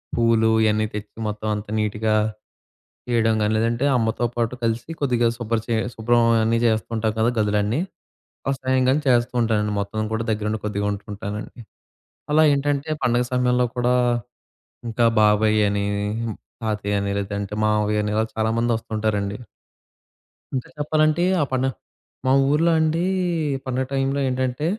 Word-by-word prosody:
పూలు 115 -1 +3
ఇయన్నీ 110 0 +2
తెచ్చి 105 0 -7
మొత్తం 105 +1 -5
అంతా 105 0 -6
నీట్‌గా 110 +1 0 0.9
చేయడం 115 -2 +2
గాని, 105 +1 +1
లేదంటే 115 +3 0
అమ్మతో 115 +1 0
పాటు 115 +1 0
కలిసి, 115 +5 -1
కొద్దిగా 120 -4 +2
శుభ్ర 115 -1 -1
చె 115 - 0 0.2
శుభ్రం 120 +1 +2 0.2
అన్నీ 115 +1 +2
జేస్తూ 110 -3 +1
ఉంటాం 110 -1 0
కదా! 115 +2 +3
గదులన్నీ 105 +5 +1 0.7
ఆ - - +3
సాయం 130 0 +1
గాని 135 +4 +3
చేస్తూ 120 -1 +3
ఉంటానండి. 105 -2 +1
మొత్తం 110 +2 -3
గూడా 110 +1 -1
దగ్గరుండి 105 0 -1
కొద్దిగా 105 -1 -1
ఉంటుంటానండి. 105 +2 -7 0.7
అలా 155 +1 +5
ఏంటంటే, 145 +1 0
పండుగ 120 -1 +2
సమయంలో 125 0 +2
కూడా, 125 0 +2 0.9
ఇంకా 115 +1 +1 0.2
బాబాయ్ 105 0 +4
అని, 100 0 -1 0.8
తాతయ్య 105 -2 -1
అని 100 0 -2
లేదంటే 100 0 -4
మామయ్య 105 0 +1
అని, 105 - -1
ఇలా 110 - +2
చాలామంది 115 +2 +1
ఒస్తుంటారండి. 105 -2 -2 1.2
ఇంకా 130 - -3
చెప్పాలంటే 155 +2 +2 0.2
ఆ - - +4
పన 130 0 +1 0.6
మా 130 - +3 0.2
ఊర్లో 160 +4 +3
అండి 160 +2 +1 0.6
పండగ 130 0 -1
టైంలో 135 +1 0
ఏంటంటే 130 +2 -1
115 Hz, 140 wpm, -22 LUFS, 105-125 Hz, 1.2 s, అలా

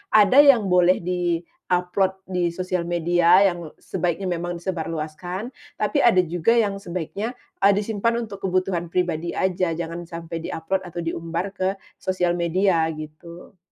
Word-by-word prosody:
ada 215 +5 +7
yang 245 -10 +6
boleh 180 0 +4
di-upload 180 +2 -1
di 180 -3 -1
sosial 185 -1 -2
media 175 +3 +4
yang 175 -2 -7 0.2
sebaiknya 180 +1 -2
memang 175 0 -3
disebarluaskan, 175 +4 -4 0.2
tapi 290 - 0
ada 220 -9 +5
juga 175 +6 +1
yang 205 -4 +2
sebaiknya, 190 +5 -4 0.3
eee, 200 - +7
disimpan 220 +3 0
untuk 200 - -7
kebutuhan 185 -2 0
pribadi 175 -2 -1
aja, 185 -2 0
jangan 170 +1 -4
sampai 165 -1 -6
di-upload 190 +4 -2
atau 175 -1 -5
diumbar 165 +2 -3
ke 190 -1 -1 0.2
sosial 180 -2 0
media 170 0 +2
gitu. 155 +4 -11
180 Hz, 135 wpm, -23 LUFS, 170-190 Hz, 0.3 s, ada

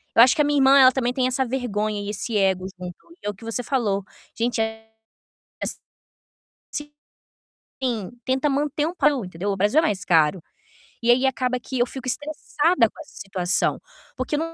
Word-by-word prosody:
Eu 230 - +8
acho 250 - +7
que 300 - +3
a - - 0
minha 290 -1 +2
irmã, 270 +1 +6
ela 260 -1 +8
também 245 -2 0
tem 255 0 0
essa 255 +1 +1
vergonha 215 -5 -2
e 200 - -5
esse 215 +2 -2
ego 190 -2 +1
junto, 180 -1 -7 0.3
e - - -11
é - - +1
o - - -13
que 200 - -17
você 230 +2 -2
falou, 210 -8 0 0.3
gente, 235 0 0
eh 220 0 -4 0.8
es - - -1 2.0
sim, 230 -7 -2
tenta 260 +3 +1
manter 295 +2 0
um 345 - -4
pa 295 -3 +4
entendeu. 200 - -3
O 195 - -1
Brasil 210 +11 +3
é - - -3
mais 200 - -1
caro. 165 0 +3 0.6
E 240 - +5
aí 255 +2 +3
acaba 255 -1 -1
que 255 +2 -5
eu 240 - +4
fico 260 0 -8
estressada 295 0 +1
com - - -19
essa - - -14
situação, 190 -2 0 0.4
porque 255 +3 -2
eu - - 0
245 Hz, 195 wpm, -23 LUFS, 205-265 Hz, 2.0 s, Eu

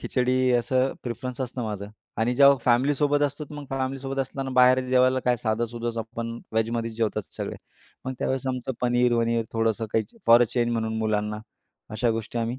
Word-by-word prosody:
खिचडी, 130 0 +1
असं 130 +2 +2
प्रिफरन्स 125 +1 -5
असतं 125 -1 -3
माझं. 105 -2 -5 0.3
आणि 115 +2 +1
जेव्हा 140 +1 +7
फॅमिलीसोबत 145 +4 +2
असतो, 145 +2 -6
तर 150 - -12
मग 145 -1 -7
फॅमिलीसोबत 135 0 -3
असताना 135 0 -4
बाहेर 130 0 +6
जेवायला 130 0 +3
काय, 125 -1 +3
साधं-सुधंच 115 +1 -2
आपण 115 +1 -5
व्हेजमध्येच 115 +1 -1
जेवतो 110 -2 0 0.2
सगळे. - - -4 0.5
मग 130 - -3
त्यावेळेस 135 0 -1
आमचं 130 0 -3
पनीर-वनीर, 120 -2 +2
थोडंसं 115 0 0
काही 110 - +2 0.2
फॉर 115 +1 +8
अ - - +5
चेंज 120 -1 0
म्हणून 110 -1 -1
मुलांना, 105 -1 -1 0.5
अशा 115 +2 0
गोष्टी 115 +1 -3
आम्ही 115 +2 -2
120 Hz, 165 wpm, -25 LUFS, 115-130 Hz, 0.5 s, फॉर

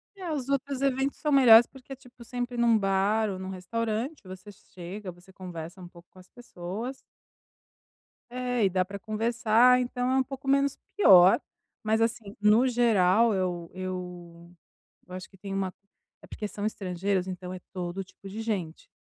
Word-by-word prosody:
É, 365 -4 -6
os 275 -3 -3
outros 275 0 -1
eventos 270 0 0
são 300 - -1
melhores, 240 -4 +8
porque, 265 0 -11
tipo, 250 -2 -16
sempre 245 0 -5
em 235 - +2
um 230 -1 +5
bar 205 +2 +1
ou 190 - -4
em - - -6
um 190 - -6
restaurante, 225 - -3
você 185 +2 -11
chega, 185 +1 -9
você 175 +2 -18
conversa 180 -1 -9
um 175 - -9
pouco 175 0 -17
com 185 - -17
as 180 - -17
pessoas. 230 +2 -7 1.4
É, 245 -3 0
e - - +3
dá 185 0 +1
pra 200 +2 -8
conversar. 230 +3 +3
Então 250 0 -2
é 260 - +2
um 265 - +3
pouco 270 +1 -9
menos 275 0 +2 0.2
pior. 190 - +7 0.4
Mas, 220 +1 +1
assim, 220 -3 -2
no 215 +5 +5
geral, 230 -2 +3
eu 180 -3 -2
eu 180 -2 -7 0.6
eu 180 - -12
acho 185 - -8
que 195 - -20
tem 195 +1 -7
uma 190 -1 -2 0.5
é - - -15
porque 210 - -5
são 205 0 -5
estrangeiros. 190 -2 -2
Então 180 0 -6
é 185 - -7
todo 180 +1 -4
tipo 190 +1 -15
de 210 +3 -6
gente. 190 -8 -4
210 Hz, 180 wpm, -27 LUFS, 185-245 Hz, 1.4 s, melhores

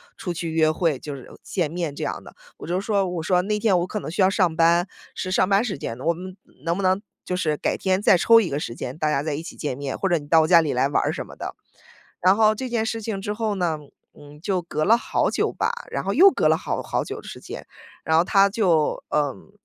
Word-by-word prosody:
出 180 - -5
去 165 -1 -4
约 160 -1 +3
会， 155 -3 0
就 150 - -7
是 135 -3 -10
见 175 -6 -1
面 165 -3 -3
这 - - -4
样 - - -4
的。 - - -13 0.2
我 - - -9
就 180 +2 0
说， 200 -2 0
我 175 -2 -3
说： 180 +1 +2
“那 210 +1 -1
天 205 -4 +3
我 175 - -1
可 210 - -3
能 - - -6
需 180 +5 -1
要 190 - +5
上 185 -5 +1
班， 170 +2 +3 0.3
是 185 - -4
上 185 +1 +2
班 195 +1 +4
时 200 -10 -3
间。 115 -3 -6
我 165 +5 +1
们 185 +3 -9 0.3
能 170 +2 -1
不 200 - -2
能 185 +1 +2 0.2
就 180 - -2
是 155 -4 0
改 - - -1
天 190 0 0
再 190 - +5
抽 230 +5 +6
一 205 -6 -1
个 140 - -2
时 115 - -4
间， 130 +2 -6
大 155 -1 0
家 140 - +1
再 155 - -2
一 155 +3 -4
起 - - -10
见 135 -4 -3
面， 140 -1 -4
或 195 - 0
者 175 -3 +2
你 145 - -12
到 160 +2 +5
我 155 - +1
家 170 0 +7
里 150 - -1
来 130 +2 +2
玩 145 - +1
儿。” - - 0
什 - - -5
么 - - -13
的。 - - -6 0.7
然 185 +3 +4
后 215 -1 +4
这 260 +3 -5
件 230 -2 0
事 225 0 -3
情 215 -2 -3
之 205 +1 -3
后 215 -1 -2
呢， 175 -4 0 0.4
嗯， 145 0 -14
就 185 0 -1
隔 155 -2 -3
了 225 - +6
好 - - 0
久 - - 0
吧， - - 0 0.2
然 - - -2
后 195 - -1
又 380 - +8
隔 - - +1
了 - - +4
好 - - -3
好 - - -2
久 - - -6
的 - - -14
时 - - -8
间， - - -9 0.4
然 160 0 +2
后 165 - +5
他 195 0 +4
就 180 -8 +1
嗯， 145 +5 -2
175 Hz, 295 characters per minute, -23 LUFS, 155-195 Hz, 0.7 s, 又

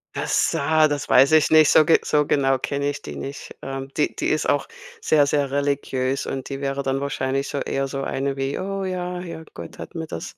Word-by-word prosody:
Das, - - +1
ah, 155 +2 +3
das 145 -1 -3
weiß 135 +4 +6
ich 155 - +5
nicht, 155 -1 +7
so 155 - +6
ge 165 - +4
so 150 -1 +1
genau 135 -2 +2
kenne 140 +2 -2
ich 145 - -5
die - - -8
nicht. 135 0 -7
Ähm, 135 0 -5
die 150 - +1
die - - -2
ist 155 - 0
auch 145 - +1 0.4
sehr, 145 - +3
sehr 140 -2 0
religiös 140 -2 -1
und 135 -1 -4
die 140 0 -6
wäre 140 0 -2
dann 135 +1 -1
wahrscheinlich 135 0 -2
so - - -4
eher 135 0 -2
so 135 0 -4
eine 135 0 -2
wie: 135 +1 -2
„Oh 195 0 -3
ja, 180 -1 -3
ja, 170 -2 -7
Gott 85 -1 -9
hat - - -9
mir 160 -1 -5
das 80 - -7
140 Hz, 225 wpm, -23 LUFS, 135-155 Hz, 0.4 s, nicht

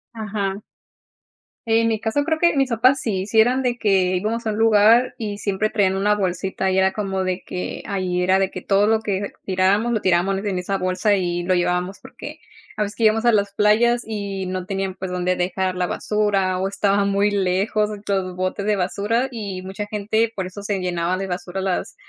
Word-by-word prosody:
Ajá. 205 -3 -3 1.1
En 225 0 +3
mi 220 -1 0
caso, 230 +6 0
creo 320 0 0
que 340 0 +3
mis 270 -2 +2
papás 255 +4 +3
sí, 195 -6 -2
si 220 +2 +2
eran 250 +4 +2
de 245 -1 0
que 190 -3 +2
íbamos 225 +5 -2
a 220 - 0
un 210 - -4
lugar 225 +2 +4
y 205 -2 -5
siempre 205 +1 -1
traían 195 -3 +2
una 205 +2 +2
bolsita. 190 -1 -1
Y 190 - 0
era 190 0 +3
como 195 -2 -2
de 185 0 -2
que, 180 - -5
ahí 185 -3 -1
era 185 +1 +3
de 195 -1 0
que, 185 - -6
todo 200 +2 +2
lo 220 +1 +3
que 200 -2 -2
tirábamos, 195 +5 +2
lo 225 - +1
tirábamos 185 +1 +1
en 195 -2 -2
esa 195 +2 -2
bolsa, 185 +3 +1
y 175 -2 -1
lo 185 +1 +1
llevábamos. 180 +2 -1
Porque - - -10 0.4
a 210 - +1
veces 205 +1 -5
que 230 - 0
íbamos 220 +2 +3
a 240 - +6
las 200 -2 +1
playas 230 +4 +3
y 200 -3 -4
no 185 0 -4
tenían, 195 -1 -2
pues, 190 0 -6
donde 180 0 0
dejar 185 +1 -1
la 180 -1 -1
basura, 200 -3 0
o 190 - 0
estaban 200 0 +1
muy 200 +1 +2
lejos 200 +2 +1 0.2
los 190 -2 -1
botes 185 +2 -2
de 210 - +3
basura, 205 +6 0
y 200 -6 -5
mucha 195 +2 -6
gente 220 +2 0
por 190 - -3
eso 185 +3 -8
se 200 -1 -2
llenaba 180 0 -1
de 195 - -3
basura 180 0 -4
las 190 -1 -2
200 Hz, 210 wpm, -21 LUFS, 185-215 Hz, 1.1 s, a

